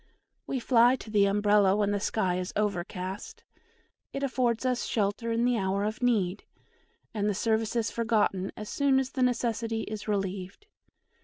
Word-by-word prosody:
We 265 - -1
fly 240 0 +4
to 225 -4 -10
the 205 -2 +4
Umbrella 205 -1 +3
when 205 -1 +1
the 205 - 0
sky 185 -3 0
is 180 - -4
overcast 200 - -3 0.7
it 275 - -4
affords 250 -3 0
us 250 -1 0
shelter 215 +2 -1
in 230 +1 +1
the 245 -2 +2
hour 195 +1 0
of 215 +4 -3
need 210 -6 +1 0.7
and 210 -1 0
the 205 - -1
service 220 +2 0
is 230 -2 0
forgotten 215 -5 0
as 210 - -6
soon 280 +1 +2
as 265 -1 0
the 260 - -3
necessity 230 -2 0
is 215 0 -6
relieved. 195 - -3
215 Hz, 165 wpm, -28 LUFS, 200-240 Hz, 0.7 s, fly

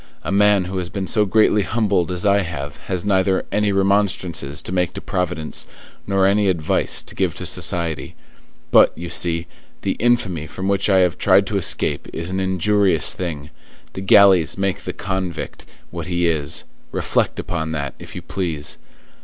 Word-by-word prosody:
a - - -3
man 100 -1 +4
who 95 +1 -3
has 90 -1 -3
been 95 +1 -4
so 105 +2 +1
greatly 105 +1 +3
humbled 100 -5 0
as 90 +3 -2
I 100 0 +4
have 75 -6 -5
has 95 0 -2
neither 95 -1 +2
any 105 0 +1
remonstrances 95 -7 0
to - - -6
make 90 -2 0
to - - -5
Providence, 80 -4 -3 0.4
nor 95 -1 +2
any 100 +1 +3
advice 85 -5 0
to - - -9
give - - -1
to - - -5
society; 80 -6 0 0.6
but, - - +6
you 85 +1 -6
see, 85 -1 0 0.4
the - - 0
infamy 100 -10 +1
from 95 +5 -5
which 100 +1 +1
I 95 -1 +5
have 90 -1 +1
tried 95 0 +4
to 100 +1 -2
escape 95 - +1
is 85 +2 -5
an 95 - -1
injurious 95 -1 +2
thing; 80 -4 -5 0.4
the 95 - -6
galleys 95 -4 +5
make 95 0 -2
the - - -3
convict 95 -3 -4 0.2
what 85 -1 -6
he 85 -1 0
is; 80 -4 0 0.3
reflect - - 0
upon 80 -2 -3
that, 70 -3 -3
if - - -10
you - - -6
please. 80 -5 -4
95 Hz, 175 wpm, -20 LUFS, 85-100 Hz, 0.6 s, but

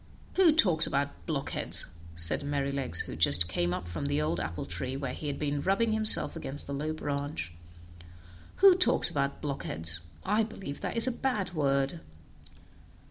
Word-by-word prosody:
"Who 370 -4 +4
talks 180 - +4
about 140 0 -4
blockheads?" 150 -4 -2 0.3
said 85 -2 0
Merrylegs, 140 -2 -2
who - - -7
just 85 +4 +7
came 85 -1 -2
up 90 - -5
from 85 -4 -5
the 70 +1 -1
old 75 +2 -1
apple 85 +3 -5
tree, 130 +1 -4
where 135 -2 -5
he 150 - -7
had 145 - -4
been 145 -1 -3
rubbing 195 +7 0
himself 215 -4 +6
against 145 -3 -6
the 140 - -6
low 150 +3 -3
branch. 140 - -5 1.0
"Who 390 -1 +6
talks 365 - +3
about 140 0 -3
blockheads? 85 - -3 0.3
I 210 +3 +1
believe 195 -9 -7
that - - -4
is 230 - +8
a 260 - +2
bad 235 -8 -3
word." 140 0 -1
140 Hz, 165 wpm, -28 LUFS, 125-185 Hz, 1.0 s, is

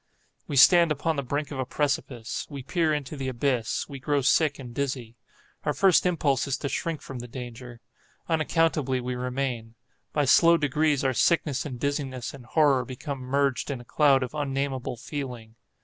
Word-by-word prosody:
We 145 - -4
stand 170 +4 +7
upon 155 +2 0
the 140 - -1
brink 145 +3 -3
of 135 - -5
a - - +1
precipice. 135 -5 -2
We 140 -3 -7
peer 160 +3 +1
into 145 -1 -3
the 135 -2 -4
abyss—we 130 +1 -1
grow 140 +1 0
sick 145 +2 +3
and 125 -3 -9
dizzy. 125 -4 -3 0.5
Our 150 - 0
first 190 -2 +4
impulse 145 -6 +1
is 135 -1 -1
to 140 - -3
shrink 165 +1 -3
from 130 -3 -7
the 120 - -7
danger. 120 -1 -9 0.5
Unaccountably 155 -4 +1
we 125 0 -3
remain. 125 -2 -3 0.4
By 145 -1 +1
slow 170 +5 +6
degrees 150 0 +1
our 130 -1 +2
sickness 150 -1 +1
and 125 -4 -7
dizziness 135 -3 -3
and 130 -4 -12
horror 140 -3 +3
become 135 +3 -6
merged 135 +1 0
in 135 -3 -3
a 120 - -12
cloud 140 -1 +3
of 125 - -6
unnamable 135 -3 -2
feeling. 125 -4 -6
140 Hz, 175 wpm, -26 LUFS, 125-150 Hz, 0.5 s, stand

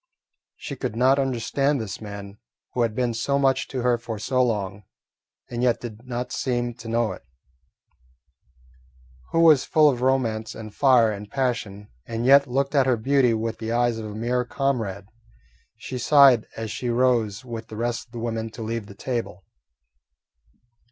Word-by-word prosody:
She 140 - -7
could 125 -3 -4
not 130 +4 +4
understand 135 +2 0
this 110 -2 -6
man 100 -1 -8 0.3
who 125 - 0
had 115 -2 0
been 125 -1 0
so 140 +5 0
much 135 -1 +2
to 130 -2 -4
her 120 -1 +2
for 115 -1 -6
so 130 +4 0
long, 105 -4 -2 0.7
and 120 0 -3
yet 125 -2 +2
did 120 +1 -9
not 125 0 -4
seem 120 -2 -1
to 115 - -10
know 115 -2 0
it; 95 - -9 2.1
who 165 - +2
was 155 -5 +6
full 155 -1 +4
of 125 -2 -5
romance 120 -4 0
and 110 -2 -9
fire 125 -5 +4
and 105 0 -7
passion, 115 -6 -2 0.2
and 115 +1 -3
yet 140 +1 +6
looked 135 +3 -1
at 135 -3 +3
her 125 -2 +3
beauty 125 0 +2
with 115 0 -3
the 110 0 -4
eyes 120 -1 +1
of 110 - -5
a 105 - -8
mere 120 +3 0
comrade. 115 -7 -2 0.7
She 130 - -6
sighed 135 -3 +6
as 110 -2 -4
she 125 - -3
rose 120 -2 +1
with 115 -2 -7
the 110 - -9
rest 120 +1 -2
of - - -34
the 120 - -8
women 115 -1 -3
to 115 - -7
leave 115 -1 -4
the 100 - -12
table. 115 -6 -4
120 Hz, 175 wpm, -24 LUFS, 110-130 Hz, 2.1 s, was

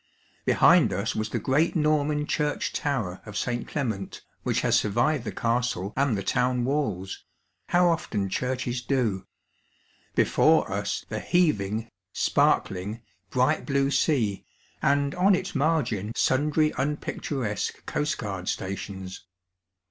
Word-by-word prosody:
Behind - - +5
us - - -1
^^|bi 110 0 -2
the - - -2
great 150 +6 +1
Norman 150 -1 +1
church 150 -1 -1
tower 120 -11 -2
of 105 -2 -7
St. 120 -1 -2
Clement^ 110 -10 -3 0.2
which - - 0
has - - +3
anrvived 125 +6 +1
the - - -3
castle 115 -5 -1
and 135 -6 +1
the 100 - -3
town 125 +4 +1
walls 110 -10 -2 0.4
(how 175 0 +4
often 115 - 0
churches 125 +3 -2
do 120 -8 -1 0.4
!), - - -37
before - - +3
us - - -2
the - - -3
heaving, 115 - +1 0.3
sparkling, 100 +5 +1 0.3
bright 130 +7 +2
blue 140 -1 +1
sea, 115 -11 +1 0.4
and 140 0 +2
on 190 +2 +4
its 185 +2 -4
margin 130 - 0
sundry 150 +3 +2
unpicturesque 135 -5 -3
coast 150 0 -1
guard 95 -5 -4
stations. 95 0 -5
125 Hz, 125 wpm, -26 LUFS, 105-150 Hz, 0.4 s, Behind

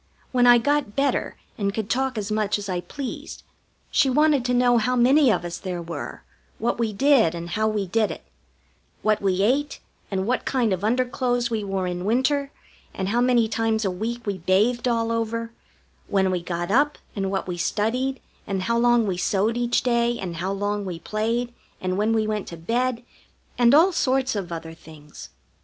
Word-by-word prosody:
When 245 -1 +4
I 240 0 +8
got 285 -3 0
better 280 0 0 0.2
and 200 -1 -1
could 220 -2 -2
talk 260 +1 -1
as 210 0 -3
much 210 -1 +1
as 205 0 -6
I 180 -2 -2
pleased, 275 +6 -7 0.5
she 270 - +3
wanted 295 0 +3
to 250 - +1
know 245 -1 +4
how 250 +3 0
many 260 +2 +5
of 175 - -1
us 175 0 -5
there 180 -2 -4
were, 170 0 -7 0.3
what 230 - -1
we 225 -2 0
did, 230 - +3
and 170 0 -6
how 215 +4 +1
we 210 -2 -1
did 215 +3 +1
it: - - -7 0.8
what 215 -1 +2
we 195 -1 +1
ate, 275 +7 +1 0.3
and 190 -1 -1
what 250 +3 0
kind 240 -6 +1
of 185 +1 -3
underclothes 245 +1 0
we 220 -2 -1
wore 195 -2 -2
in 180 0 -3
winter, 265 +6 +1 0.5
and 190 0 -2
how 235 +3 +1
many 245 -2 +3
times 220 0 0
a 190 - +1
week 230 +6 -4
we 200 -2 -2
bathed 210 +8 +2
all 230 -1 +1
over; 230 0 -2 0.6
when 190 -1 +1
we 180 -1 -1
got 175 +1 -3
up, 290 +6 +3 0.2
and 195 -2 -1
what 190 -1 -2
we 180 - -3
studied, 235 +9 -1 0.3
and 195 -3 -2
how 235 +4 +1
long 240 -1 +4
we 190 -3 -2
sewed 205 +5 +1
each 240 0 +1
day, 235 -1 +1
and 175 -5 -5
how 185 +3 -2
long 205 +1 -2
we 180 -3 -5
played, 230 +6 -2 0.3
and 185 0 -2
when 210 +3 +1
we 220 -1 +2
went 215 -2 -2
to 170 - -8
bed 240 +7 -1 0.5
and 240 +2 +5
all 340 +5 +6
sorts 260 -6 +1
of 190 -4 -4
other 165 -1 -6
things. 155 -2 -13
220 Hz, 195 wpm, -24 LUFS, 195-245 Hz, 0.8 s, I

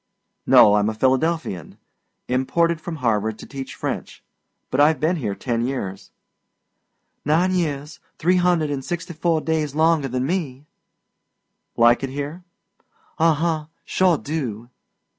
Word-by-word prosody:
"No, 105 0 +7
I'm 105 +1 +2
a 110 - -4
Philadelphian. 130 - 0 0.5
Imported 160 +6 +1
from 170 - -5
Harvard 110 -5 0
to - - -10
teach 135 -1 -7
French. - - -5 0.5
But 130 - 0
I've 150 +1 +4
been 170 +3 +1
here 105 -9 -3
ten 115 0 -2
years." 110 -7 -4 1.1
"Nine 170 +5 +2
years, 150 -4 -2 0.2
three 180 +3 +2
hundred 175 -4 +2
an' 140 -2 -2
sixty 170 +4 -5
four 160 0 0
days 155 -3 -1
longer 160 -2 +3
than 130 0 -2
me." 145 -5 -3 1.1
"Like 120 +1 +5
it 135 - -3
here?" 145 +6 -5 0.8
"Uh 165 -1 +4
huh. 160 0 -1 0.2
Sure 185 -3 +2
do!" 125 -7 -5
150 Hz, 135 wpm, -22 LUFS, 125-165 Hz, 1.1 s, No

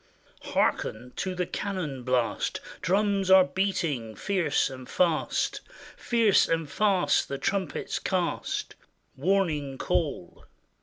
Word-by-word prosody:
Harken 125 +3 0
to 185 -1 -2
the 180 0 -1
cannon 175 -10 -4
blast 125 -2 0
I - - -13
Drums 195 +1 +1
are 190 0 +8
beating 165 - -1
fierce 185 -7 +1
and 130 -1 -9
fast: 170 -4 +1 0.3
Fierce 230 -4 +3
and 165 -1 0
fast 195 +3 +2
the 140 - -4
trumpets 195 +5 -2
cast 175 -5 -2 0.4
Warning 150 -4 0
call. - - -2
180 Hz, 110 wpm, -27 LUFS, 140-195 Hz, 0.4 s, are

